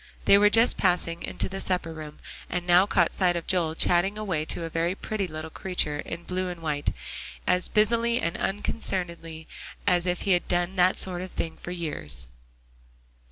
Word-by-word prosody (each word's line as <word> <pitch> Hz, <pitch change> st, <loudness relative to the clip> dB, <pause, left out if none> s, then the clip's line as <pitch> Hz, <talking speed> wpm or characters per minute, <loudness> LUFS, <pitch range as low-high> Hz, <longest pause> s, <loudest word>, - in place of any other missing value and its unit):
They -, -, +7 dB
were 210 Hz, 0 st, +6 dB
just 230 Hz, +3 st, +4 dB
passing 175 Hz, -2 st, +1 dB
into -, -, -3 dB
the 195 Hz, 0 st, -5 dB
supper 180 Hz, -3 st, -1 dB
room, 155 Hz, -1 st, -9 dB, 0.3 s
and 180 Hz, -1 st, -2 dB
now 180 Hz, +2 st, +5 dB
caught 175 Hz, -4 st, +3 dB
sight 180 Hz, -2 st, +1 dB
of 170 Hz, -, -3 dB
Joel 170 Hz, -4 st, +1 dB
chatting 180 Hz, +5 st, +2 dB
away 180 Hz, -8 st, -2 dB
to 170 Hz, -, -2 dB
a -, -, -3 dB
very 170 Hz, +3 st, 0 dB
pretty 205 Hz, -2 st, -3 dB
little 155 Hz, 0 st, -7 dB
creature, 155 Hz, -6 st, -1 dB
in 165 Hz, +3 st, -6 dB
blue 185 Hz, +1 st, -2 dB
and 175 Hz, -1 st, -6 dB
white, 145 Hz, -2 st, -1 dB, 0.5 s
as 180 Hz, 0 st, +3 dB
busily 230 Hz, +2 st, +2 dB
and 170 Hz, +1 st, -1 dB
unconcernedly 170 Hz, -5 st, -3 dB, 0.4 s
as 180 Hz, -2 st, +2 dB
if 180 Hz, 0 st, 0 dB
he 195 Hz, -, 0 dB
had 175 Hz, -1 st, +2 dB
done 175 Hz, +1 st, 0 dB
that 185 Hz, 0 st, +4 dB
sort 180 Hz, -2 st, +1 dB
of 185 Hz, -, -6 dB
thing 165 Hz, -, -3 dB
for -, -, -9 dB
years. 145 Hz, -, -2 dB
175 Hz, 185 wpm, -26 LUFS, 165-190 Hz, 0.5 s, They